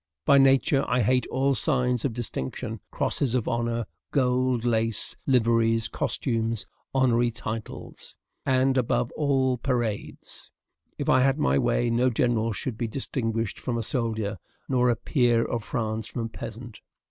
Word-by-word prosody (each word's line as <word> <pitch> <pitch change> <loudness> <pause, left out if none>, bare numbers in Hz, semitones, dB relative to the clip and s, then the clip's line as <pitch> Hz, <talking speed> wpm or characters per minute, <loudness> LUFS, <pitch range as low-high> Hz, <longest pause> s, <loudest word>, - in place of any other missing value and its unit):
By 140 -1 +6
nature, 135 +1 +4
I 125 0 +2
hate 125 +4 +2
all 135 +1 +1
signs 125 -3 +1
of 130 - 0
distinction, 110 - -4
crosses 130 -4 0
of 125 - 0
honor, 120 -1 -1 0.2
gold 125 -3 +1
lace, 115 -2 0
liveries, 115 -3 +3
costumes, 115 -3 -2 0.3
honorary 120 -3 +3
titles, 110 -1 -6
&c., - - -11 0.3
and, 130 0 +3
above 120 0 0
all, 135 -4 +1
parades. 120 -5 -2 0.5
If - - -3
I 130 - +5
had 135 +1 +3
my 150 - +2
way, 120 -1 +1
no 125 +2 +3
general 115 -1 +1
should 110 +2 -4
be 115 - -1
distinguished 115 -3 -2
from 120 -2 -2
a 115 - -2
soldier, 110 - -1 0.3
nor 125 -1 +2
a 120 - +3
peer 120 -1 +2
of 115 -2 -3
France 110 0 -2
from 120 - -4
a - - -5
peasant. 115 +1 -8
120 Hz, 150 wpm, -26 LUFS, 115-130 Hz, 0.5 s, By